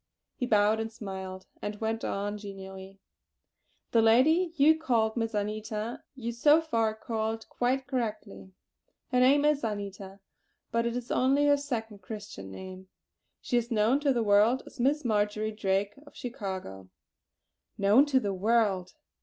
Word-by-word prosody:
He 250 - -3
bowed 210 0 +3
and 225 0 -3
smiled, 190 -3 -7 0.2
and 205 0 -5
went 225 0 -2
on 205 +1 -3
genially: 195 -1 -9 0.9
"The 230 - +4
lady 305 +11 +4
you 315 +2 +5
called 230 -7 +1
Miss 225 -2 -2
Anita, 215 +2 -3
you 235 -3 -4
so 295 +7 +5
far 230 -9 0
called 220 0 -3
quite 255 +2 0
correctly. 215 -7 -4 0.6
Her 250 - +3
name 280 +3 +5
is 300 -2 +2
Anita; 200 -2 -5 0.5
but 230 0 +1
it 235 - -2
is 245 -1 -5
only 275 +3 +3
her 290 0 +5
second 230 -7 -4
Christian 205 - -8
name. 185 - -9 0.5
She 245 - 0
is 240 0 -1
known 230 +4 +2
to 290 -1 +2
the 240 -3 +1
world 215 +5 +4
as - - -14
Miss 280 +4 +1
Marjory 215 -1 0
Drake, 200 -1 0
of - - -16
Chicago." 190 - -6 0.9
"Known 210 +9 +5
to 270 -2 +3
the 200 -5 -2
world." 195 -2 +1
220 Hz, 150 wpm, -29 LUFS, 205-250 Hz, 0.9 s, you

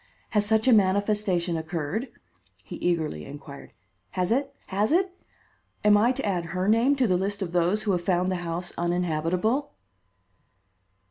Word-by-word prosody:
Has 210 -2 +1
such 220 +2 +2
a 255 - +7
manifestation 200 -3 +2
occurred?" 160 - -3 0.6
he - - -8
eagerly 160 - -1
inquired. 140 0 -10 0.5
"Has 180 +1 +1
it? 275 +3 +1
has 205 +5 0
it? 370 +3 +2 0.7
Am 210 0 +6
I 220 +4 +4
to 265 -1 -3
add 180 -4 -1
her 185 +2 -2
name 230 +6 +4
to 265 -2 +2
the 185 -5 +2
list 200 +2 -2
of 175 - -5
those 180 +4 +1
who 210 - +1
have 180 -2 +1
found 180 +1 +1
the 185 - -1
house 175 0 -3
uninhabitable?" 180 - 0
190 Hz, 155 wpm, -26 LUFS, 175-215 Hz, 0.7 s, a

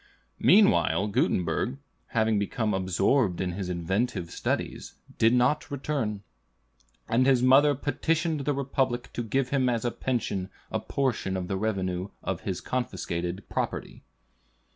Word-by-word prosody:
Meanwhile 200 - +4
Gutenberg, 100 - 0 0.3
having 110 -2 +1
become 105 +1 -1
absorbed 95 +3 +1
in 95 -1 -1
his 90 0 -4
inventive 90 +2 -1
studies, - - -3 0.2
did 115 - +5
not 125 +5 +2
return; 135 -7 -2 0.8
and 125 +3 +3
his 130 -2 +4
mother 140 +3 +6
petitioned 160 +3 0
the 145 - +1
Republic 130 -2 -1
to - - -2
give 125 +3 0
him 130 -2 +2
as 120 -1 -1
a 120 - +1
pension 105 -8 -2 0.2
a - - 0
portion 120 -8 -1
of 90 -1 -4
the 95 - -2
revenue 95 -2 -2
of - - -3
his - - -3
confiscated 95 -6 -3
property. - - -3
115 Hz, 135 wpm, -27 LUFS, 95-130 Hz, 0.8 s, mother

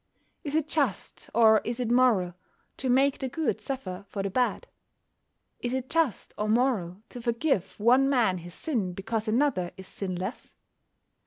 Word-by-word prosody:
Is 295 -2 -3
it 315 -1 +1
just, 280 - -2
or 220 -1 +6
is 235 +1 -3
it 240 -2 -1
moral, 235 -8 +4 0.4
to 260 - -2
make 270 +2 +3
the 265 - -2
good 320 +4 -1
suffer 205 -9 -5
for 195 - -3
the 195 - -2
bad? 250 +3 0 0.9
Is 245 +1 -2
it 260 0 -4
just 320 - 0
or 210 0 0
moral 215 -6 +1
to 245 - -8
forgive 230 - 0
one 255 +5 +5
man 225 -9 +2
his 175 +1 -11
sin 220 - -2
because 220 +4 -3
another 215 -6 +1
is 190 - -9
sinless? 185 +2 -5
235 Hz, 160 wpm, -28 LUFS, 195-265 Hz, 0.9 s, or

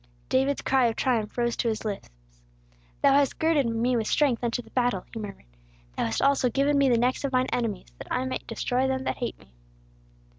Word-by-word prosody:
David's 270 +2 +1
cry 260 -2 +3
of 225 - -1
triumph 230 -5 -1
rose 235 -1 +1
to - - 0
his 220 -1 -2
lips: 205 -2 -4 0.9
"Thou 275 - +6
hast 280 0 +3
girded 315 -5 +2
me 230 +2 +1
with 225 -2 0
strength 265 -6 +2
unto 240 +1 -1
the - - -19
battle," 245 -7 0
he 225 - -5
murmured. 205 - -8 0.5
"Thou - - 0
hast 115 +1 -1
also 275 -2 +3
given 275 +4 +1
me 280 -1 +4
the 240 - +4
necks 250 +4 +1
of 275 - -1
mine 255 0 +2
enemies, 225 -6 -2
that - - -10
I 255 +1 0
might 260 - -4
destroy 255 +1 0
them 265 0 -1
that - - -2
hate 240 - -4
me!" 65 - -22
250 Hz, 215 wpm, -26 LUFS, 230-270 Hz, 0.9 s, Thou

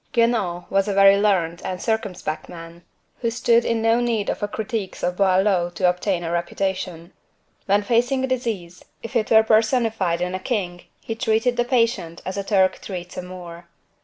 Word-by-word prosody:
Guenaud 225 -8 +1
was 195 +1 +2
a 200 - -1
very 195 0 +7
learned 180 -5 +1
and 185 -1 -4
circumspect 200 -8 -3
man, 165 0 -10 0.4
who 230 - 0
stood 235 0 +2
in 230 -1 -1
no 225 +1 +3
need 230 -4 0
of - - -5
the 205 - -2
critiques 210 -1 -4
of 180 0 0
Boileau 190 -2 +2
to 185 - +2
obtain 180 0 0
a 165 - -3
reputation. 175 0 -3 0.5
When 200 +1 +3
facing 245 +4 +1
a - - +1
disease, 220 -9 -3 0.2
if 230 - -8
it 220 -3 +1
were 220 0 +6
personified 220 -5 +2
in 180 +1 -2
a 185 - -2
king, 185 -5 -3 0.2
he 225 - -4
treated 225 +1 +1
the 240 - +1
patient 230 -9 0
as 185 - -4
a 200 - -2
Turk 195 -2 +2
treats 180 -2 -7
a - - -4
Moor. 175 -1 -10
200 Hz, 185 wpm, -22 LUFS, 180-225 Hz, 0.5 s, very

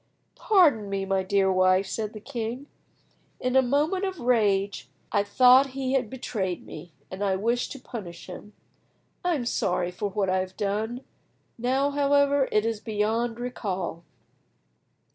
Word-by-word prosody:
"Pardon 300 - +3
me, 195 -1 -2
my 195 0 +1
dear 190 0 +2
wife," 185 +1 +3
said 215 +2 -4
the 215 - -8
king. 240 +2 -5 0.7
"In 255 +1 -1
a 265 - +7
moment 295 +9 +1
of 380 -3 -3
rage 200 - +1 0.2
I 205 - +3
thought 255 +6 +6
he 265 -1 -1
had 255 -5 +1
betrayed 205 -8 -4
me, 160 +2 -10 0.2
and 190 +2 -4
I 195 -2 +1
wished 235 +5 -1
to 275 - -10
punish 180 -10 -8
him. 200 +3 -10 0.7
I 355 -1 +1
am 255 -5 -3
sorry 180 -5 0
for 200 +3 -3
what 195 0 -1
I 185 0 +1
have 185 0 -5
done; 215 +5 -2 0.6
now, 265 +4 +1
however, 285 -1 +3
it 215 +1 +2
is 225 -2 -1
beyond 225 +2 -1
recall. 190 -8 -4
220 Hz, 155 wpm, -26 LUFS, 195-260 Hz, 0.7 s, a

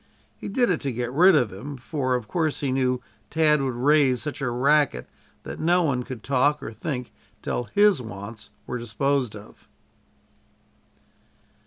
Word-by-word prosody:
He - - -8
did 240 0 +2
it 165 - -1
to 140 - -2
get 120 0 -3
rid 180 +5 +6
of 125 -9 +2
him, 140 +9 -7
for 130 -1 -1
of 120 -4 -4
course 160 +3 -1
he 140 -2 0
knew 125 -1 0 0.3
Tad 150 -2 +3
would 130 -3 -2
raise 135 0 +3
such 150 -2 -5
a 130 - 0
racket 135 - +2 0.4
that - - -7
no 175 +2 +3
one 135 -6 0
could 125 -3 -8
talk 140 +2 +2
or 115 - -6
think 125 +2 -5 0.3
till 120 - -2
his 205 -7 +5
wants 110 -1 -9 0.2
were 125 - -4
disposed 120 +1 -1
of. 105 0 -14
130 Hz, 165 wpm, -25 LUFS, 120-150 Hz, 0.4 s, rid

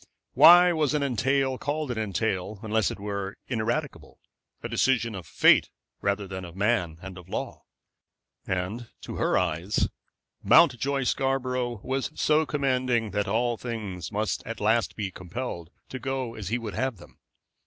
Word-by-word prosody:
Why 175 +1 +8
was 155 -2 +1
an 145 - +1
entail 130 +1 +1
called 150 -1 -2
an 115 - -3
entail 100 -1 -2
unless 110 -2 +1
it - - -7
were 100 -1 -4
ineradicable, 125 +5 -3 0.4
a - - -2
decision 115 -3 +1
of 95 -5 -7
fate - - +5 0.3
rather 100 0 -1
than 95 0 -6
of 85 -1 -10
man 95 -6 0
and 95 -1 -8
of 90 0 -15
law? - - -5 0.8
And 95 +6 -3
to - - -7
her - - +2
eyes 90 +3 0 0.5
Mountjoy 135 +3 +4
Scarborough 125 -3 -1
was 135 +1 -2
so 155 0 +3
commanding 130 -6 0
that 105 +1 -1
all 120 +3 0
things 105 -8 -5
must 110 0 -1
at 115 - -6
last 110 +2 +1
be 100 -3 -3
compelled 90 -2 -6 0.2
to 130 - -6
go 130 -3 -3
as 105 -5 -7
he 115 +5 0
would 115 -4 -6
have 130 -4 -2
them. 85 - -17
115 Hz, 155 wpm, -27 LUFS, 100-130 Hz, 0.8 s, Why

